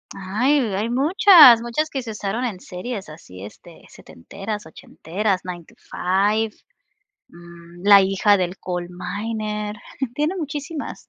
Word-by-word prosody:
Ay, 220 Hz, +10 st, 0 dB, 0.2 s
hay 210 Hz, +4 st, -2 dB
muchas, 290 Hz, -, +7 dB
muchas 240 Hz, +7 st, -2 dB
que 270 Hz, -4 st, -4 dB
se 225 Hz, -, -7 dB
usaron 210 Hz, +3 st, -3 dB
en 205 Hz, -7 st, -5 dB
series 190 Hz, 0 st, -7 dB
así, 95 Hz, -, -12 dB
este, 105 Hz, -, -13 dB
setenteras, 200 Hz, -, -8 dB
ochenteras, 185 Hz, +4 st, -4 dB
Nine 175 Hz, -2 st, -8 dB
to -, -, -20 dB, 0.2 s
Five, 205 Hz, +4 st, 0 dB, 0.8 s
mm, 170 Hz, +1 st, -15 dB
la 200 Hz, -1 st, +8 dB
hija 195 Hz, +1 st, +2 dB
del 180 Hz, +1 st, -3 dB
Coal 175 Hz, -1 st, -5 dB
Miner, 210 Hz, +3 st, -5 dB, 0.4 s
tiene 305 Hz, +5 st, -1 dB
muchísimas. 300 Hz, 0 st, -6 dB
210 Hz, 130 wpm, -21 LUFS, 180-240 Hz, 0.8 s, la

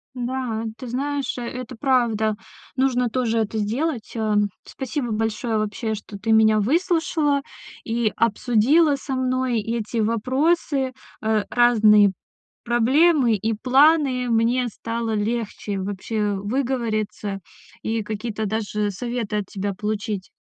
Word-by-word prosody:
Да, 245 Hz, -2 st, -3 dB
ты 255 Hz, -, -8 dB
знаешь, 275 Hz, +2 st, -2 dB
э, -, -, -4 dB
это 255 Hz, +1 st, -6 dB
правда, 225 Hz, -4 st, +1 dB, 0.4 s
нужно 250 Hz, -2 st, +2 dB
тоже 230 Hz, -2 st, 0 dB
это 220 Hz, 0 st, -1 dB
сделать. 235 Hz, +4 st, -2 dB
Ам, 210 Hz, -2 st, +1 dB
спасибо 260 Hz, -2 st, -4 dB
большое 220 Hz, +1 st, -1 dB
вообще, 215 Hz, +1 st, -2 dB
что 205 Hz, -1 st, -9 dB
ты 225 Hz, +2 st, -1 dB
меня 220 Hz, -1 st, +5 dB
выслушала 310 Hz, -, +1 dB, 0.4 s
и 225 Hz, -2 st, 0 dB
обсудила 245 Hz, +8 st, +3 dB
со 270 Hz, 0 st, -4 dB
мной 255 Hz, -2 st, 0 dB
эти 230 Hz, +1 st, -3 dB
вопросы, 260 Hz, +5 st, +1 dB, 0.3 s
э, 215 Hz, -1 st, +2 dB
разные 215 Hz, -4 st, +5 dB, 0.5 s
проблемы 250 Hz, +2 st, +3 dB
и 220 Hz, +3 st, -1 dB
планы. 265 Hz, +1 st, +3 dB
Мне 235 Hz, +2 st, +2 dB
стало 230 Hz, +1 st, -3 dB
легче 210 Hz, -2 st, -2 dB
вообще 205 Hz, +2 st, -2 dB
выговориться 215 Hz, -3 st, -2 dB, 0.4 s
и 225 Hz, 0 st, -1 dB
какие-то 215 Hz, +1 st, -4 dB
даже 210 Hz, -1 st, -1 dB
советы 235 Hz, 0 st, -3 dB
от 200 Hz, -2 st, -3 dB
тебя 200 Hz, 0 st, -3 dB
получить. 210 Hz, -1 st, -3 dB
230 Hz, 120 wpm, -23 LUFS, 215-255 Hz, 0.5 s, меня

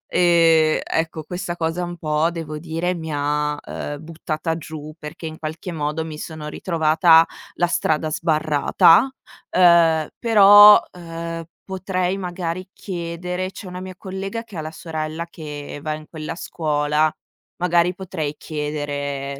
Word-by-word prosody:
Ehm, 165 Hz, -3 st, +4 dB
ecco, 160 Hz, -1 st, -2 dB
questa 175 Hz, +1 st, -5 dB
cosa 165 Hz, +1 st, -2 dB
un 175 Hz, 0 st, -5 dB
po' 155 Hz, +1 st, +1 dB
devo 155 Hz, -3 st, -6 dB
dire 170 Hz, +2 st, -2 dB
mi 160 Hz, -2 st, -6 dB
ha, 150 Hz, +1 st, 0 dB
ehm, 145 Hz, 0 st, -5 dB
buttata 160 Hz, 0 st, -3 dB
giù 155 Hz, -1 st, -8 dB
perché 150 Hz, +3 st, -8 dB
in 160 Hz, 0 st, -6 dB
qualche 160 Hz, +3 st, -5 dB
modo 155 Hz, 0 st, -2 dB
mi 155 Hz, -1 st, -7 dB
sono 155 Hz, -2 st, -6 dB
ritrovata 165 Hz, 0 st, +4 dB, 0.3 s
la 175 Hz, -, +2 dB
strada 155 Hz, -2 st, 0 dB
sbarrata. 160 Hz, -, +3 dB, 0.4 s
Ehm, 170 Hz, -3 st, +5 dB
però, 205 Hz, -2 st, +9 dB
ehm, 165 Hz, -1 st, -6 dB, 0.2 s
potrei 185 Hz, -1 st, -2 dB
magari 180 Hz, 0 st, -4 dB
chiedere 180 Hz, 0 st, -4 dB
c'è 195 Hz, -, -10 dB
una 180 Hz, 0 st, -7 dB
mia 185 Hz, 0 st, -8 dB
collega 195 Hz, +4 st, -5 dB
che 215 Hz, -5 st, -14 dB
ha 155 Hz, -, -2 dB
la 155 Hz, -, -6 dB
sorella 160 Hz, -1 st, -5 dB
che 150 Hz, -3 st, -8 dB
va 155 Hz, 0 st, -2 dB
in 155 Hz, 0 st, -10 dB
quella 155 Hz, 0 st, -6 dB
scuola, 150 Hz, -2 st, 0 dB, 0.5 s
magari 175 Hz, 0 st, +2 dB
potrei 170 Hz, -6 st, -4 dB
chiedere 145 Hz, -2 st, -4 dB
165 Hz, 140 wpm, -21 LUFS, 155-180 Hz, 0.5 s, però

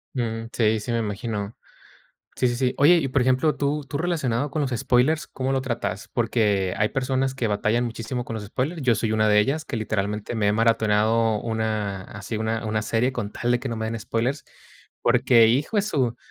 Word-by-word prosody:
Mm, 115 Hz, -2 st, -2 dB
sí, 110 Hz, -1 st, +2 dB
sí 120 Hz, +3 st, -5 dB
me 115 Hz, -, +1 dB
imagino. 105 Hz, 0 st, -4 dB, 0.8 s
Sí, 125 Hz, -, +2 dB
sí, 120 Hz, -, -1 dB
sí. 125 Hz, 0 st, 0 dB
Oye, 160 Hz, +5 st, +6 dB
y 135 Hz, -4 st, -1 dB
por 130 Hz, -1 st, +1 dB
ejemplo, 130 Hz, +5 st, +2 dB
tú 145 Hz, +1 st, -1 dB
tú 140 Hz, -, -3 dB
relacionado 145 Hz, -6 st, -1 dB
con 155 Hz, -, -2 dB
los 135 Hz, -, -1 dB
spoilers, 130 Hz, +5 st, +2 dB
¿cómo 130 Hz, +1 st, -3 dB
lo 135 Hz, -, +1 dB
tratas? 120 Hz, -6 st, -3 dB
Porque 105 Hz, -6 st, +1 dB
hay 105 Hz, +1 st, +1 dB
personas 135 Hz, 0 st, -1 dB
que 125 Hz, -3 st, -1 dB
batallan 110 Hz, +3 st, +1 dB
muchísimo 120 Hz, +1 st, -4 dB
con 115 Hz, -, -6 dB
los 105 Hz, -2 st, -5 dB
spoilers, 140 Hz, -, -3 dB
yo 125 Hz, -3 st, +3 dB
soy 110 Hz, 0 st, -1 dB
una 110 Hz, 0 st, +2 dB
de 105 Hz, 0 st, +5 dB
ellas, 150 Hz, +8 st, 0 dB
que 130 Hz, -, -4 dB
literalmente 105 Hz, 0 st, -2 dB
me 105 Hz, -2 st, +1 dB
he -, -, +3 dB
maratoneado 110 Hz, 0 st, +2 dB
una 110 Hz, -4 st, -2 dB
así 105 Hz, +3 st, -7 dB
una 110 Hz, +1 st, -2 dB
una 110 Hz, 0 st, -1 dB
serie 120 Hz, +4 st, 0 dB
con 105 Hz, -5 st, -4 dB
tal 120 Hz, 0 st, -1 dB
de 120 Hz, -, +2 dB
que 135 Hz, -, -4 dB
no 115 Hz, -, -3 dB
me 110 Hz, 0 st, -3 dB
den 115 Hz, -, -3 dB
spoilers, 120 Hz, +6 st, -2 dB, 0.6 s
porque, 120 Hz, -1 st, +5 dB
hijo 140 Hz, -, +1 dB
de 200 Hz, -, +3 dB
su 130 Hz, -, 0 dB
115 Hz, 210 wpm, -24 LUFS, 110-130 Hz, 0.8 s, Oye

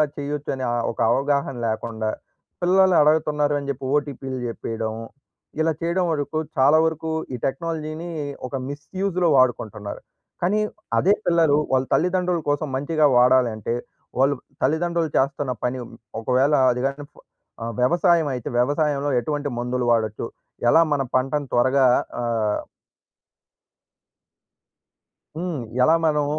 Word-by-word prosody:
చేయొచ్చు. 145 Hz, 0 st, -4 dB
అనే 130 Hz, -1 st, -3 dB, 0.3 s
ఒక -, -, -13 dB
అవగాహన 140 Hz, +1 st, 0 dB
లేకుండా 110 Hz, 0 st, -2 dB, 0.5 s
పిల్లలు 185 Hz, +1 st, +4 dB
అడగుతున్నారు 150 Hz, -1 st, +2 dB
అని 140 Hz, -, -7 dB
చెప్పి 135 Hz, -1 st, -4 dB
ఓటీపీలు 135 Hz, -3 st, -3 dB
చెప్పేయడం 115 Hz, -1 st, -4 dB, 0.7 s
ఇలా 160 Hz, +1 st, +2 dB
చేయడం 170 Hz, +2 st, 0 dB
వరకు, 155 Hz, 0 st, -2 dB, 0.2 s
చాలా 140 Hz, +4 st, +5 dB
వరకు 160 Hz, 0 st, -2 dB, 0.2 s
ఈ -, -, -1 dB
టెక్నాలజీని 155 Hz, +3 st, -3 dB, 0.4 s
ఒక 135 Hz, -, -6 dB
మిస్‌యూ‌జ్‌లో 180 Hz, +5 st, -2 dB
వాడకుంటున్నారు. 110 Hz, -5 st, 0 dB, 0.4 s
కానీ 195 Hz, +5 st, +2 dB, 0.4 s
అదే 195 Hz, -, +4 dB
పిల్లలు 165 Hz, -4 st, +4 dB
వాళ్ళ 130 Hz, 0 st, +2 dB
తల్లిదండ్రుల 180 Hz, 0 st, +1 dB
కోసం 145 Hz, +1 st, 0 dB
మంచిగా 150 Hz, +3 st, +1 dB
వాడాలంటే 125 Hz, -3 st, +3 dB, 0.5 s
వాళ్ళు 135 Hz, +2 st, +4 dB, 0.3 s
తల్లిదండ్రులు 165 Hz, +3 st, +1 dB
చేస్తున్న 140 Hz, 0 st, 0 dB
పని, 125 Hz, +1 st, -1 dB, 0.4 s
ఒకవేళ 130 Hz, +5 st, +2 dB, 0.2 s
అది 125 Hz, 0 st, -2 dB
కాని 140 Hz, +1 st, -5 dB, 0.6 s
ఆహ్, 115 Hz, 0 st, -4 dB
వ్యవసాయం 170 Hz, +4 st, +3 dB
అయితే 125 Hz, -3 st, -4 dB
వ్యవసాయంలో 145 Hz, +2 st, +1 dB
ఎటువంటి 145 Hz, +3 st, -2 dB
మందులు 125 Hz, +1 st, -1 dB
వాడొచ్చు 110 Hz, -1 st, 0 dB, 0.4 s
ఎలా 160 Hz, -, +6 dB
మన 145 Hz, -2 st, +2 dB
పంటను 135 Hz, +3 st, 0 dB
త్వరగా 130 Hz, +2 st, +4 dB, 0.4 s
ఆహ్ 115 Hz, -3 st, 0 dB, 2.8 s
హ్మ్. 165 Hz, -5 st, -3 dB, 0.2 s
ఎలా 160 Hz, +5 st, +5 dB
మనం 150 Hz, -2 st, +2 dB
145 Hz, 115 wpm, -23 LUFS, 125-160 Hz, 2.8 s, ఎలా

